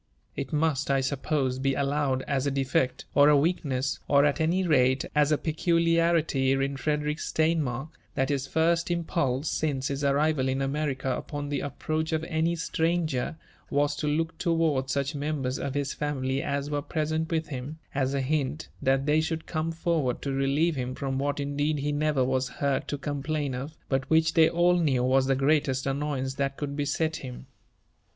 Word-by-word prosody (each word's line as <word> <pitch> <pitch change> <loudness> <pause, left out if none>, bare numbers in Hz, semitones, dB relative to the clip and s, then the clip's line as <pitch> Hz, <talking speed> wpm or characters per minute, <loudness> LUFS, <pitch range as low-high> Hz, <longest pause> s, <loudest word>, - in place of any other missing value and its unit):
It 135 -2 -4
must, 150 -2 +1
I 135 0 +3
suppose, 135 -1 -1
be 135 0 +1
allowed 140 -2 0
as 140 0 -1
a - - +3
defect, 135 -1 0
or 145 +1 +6
a 150 - +6
weakness, 140 -4 0
or, 140 0 +5
at 145 +1 +1
any 180 +4 +2
rate, 130 -5 +3
as 150 0 +3
a 150 - +4
peculiarity 165 -3 +2
in 135 +1 0
Frederick 150 +1 -1
Steinmark, 155 -5 0 0.3
that 135 0 +1
his 135 -2 -1
first 165 +3 +1
impulse 160 -5 0
since 140 -4 -1
his 140 +1 -3
arrival 140 0 +2
in 130 +1 0
America 135 -1 -1
upon 145 -1 -5
the 145 -1 -1
approach 155 +3 -2
of 160 0 0
any 165 +1 0
stranger, 160 -4 -1 0.3
was 145 +1 +1
to 150 - -2
look 160 +2 0
towards 160 -6 +1
such 140 0 -1
members 145 -2 -2
of 140 -1 -3
his 140 -1 -1
family 135 -2 -1
as 140 0 -2
yrere 145 -1 -3
present 160 0 -1
with 160 -2 -1
him, 135 +2 -5 0.2
as 135 0 0
a 135 - +1
hint 150 +1 -1
that 135 +1 +2
they 150 +1 +3
should 160 0 -3
come 160 +1 -2
forward 160 -6 0
to 140 - -2
relieve 140 +5 +1
him 125 -1 -3
from 135 -1 -2
what 145 +1 -1
indeed 145 +2 0
he 145 +1 -1
never 145 -3 +1
was 130 0 0
heard 140 +1 -1
to 145 - -2
complain 145 0 -2
of, 135 +5 -6
but 135 -1 -1
which 160 0 +3
they 160 -1 +6
all 175 +1 +3
knew 135 -7 +2
was 130 +1 +3
the 135 - +3
greatest 135 -1 +1
annoyance 135 -1 -1
that 135 0 -2
could 140 -1 -4
beset 155 +2 -1
him. 60 0 -8
145 Hz, 180 wpm, -27 LUFS, 135-155 Hz, 0.3 s, or